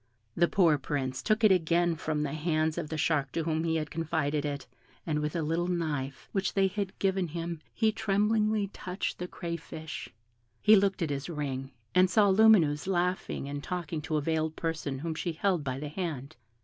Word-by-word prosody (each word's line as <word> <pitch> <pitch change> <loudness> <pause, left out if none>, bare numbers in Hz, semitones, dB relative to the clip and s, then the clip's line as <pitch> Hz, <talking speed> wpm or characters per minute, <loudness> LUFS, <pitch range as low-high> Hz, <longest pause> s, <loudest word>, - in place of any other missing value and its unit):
The 175 - +4
poor 165 -7 +4
Prince 130 -2 -2
took 215 +1 +1
it 215 - +7
again 175 -1 +3
from 150 -1 -2
the 145 -1 -3
hands 155 0 0
of 155 -3 -4
the 160 - -3
shark 145 -3 +1
to 165 - 0
whom 160 0 0
he 165 -1 +1
had 155 -2 -2
confided 155 -2 -1
it, 140 -1 -3 0.4
and 150 -2 0
with 150 +1 -2
a 165 - 0
little 165 +3 0
knife 150 -6 -2
which 195 -1 -1
they 195 -1 +4
had 190 0 -2
given 190 -2 +1
him 165 0 -5
he 220 -1 +2
tremblingly 210 0 +1
touched 185 0 -4
the 180 - -3
crayfish; 165 -2 -6 0.5
he 215 0 +7
looked 195 -2 +2
at 155 - -1
his 140 +3 -3
ring, 135 -4 -3 0.2
and 185 0 +5
saw 205 +1 +4
Lumineuse 190 -8 +5
laughing 180 -5 -1
and 145 0 -5
talking 170 -4 -3
to 155 +1 -1
a - - +1
veiled 160 +1 -1
person 160 -4 -3
whom 160 +4 -3
she 170 +1 -3
held 175 -1 +1
by 130 -2 -2
the 150 0 -5
hand. 155 -4 -4
165 Hz, 195 wpm, -29 LUFS, 150-185 Hz, 0.5 s, it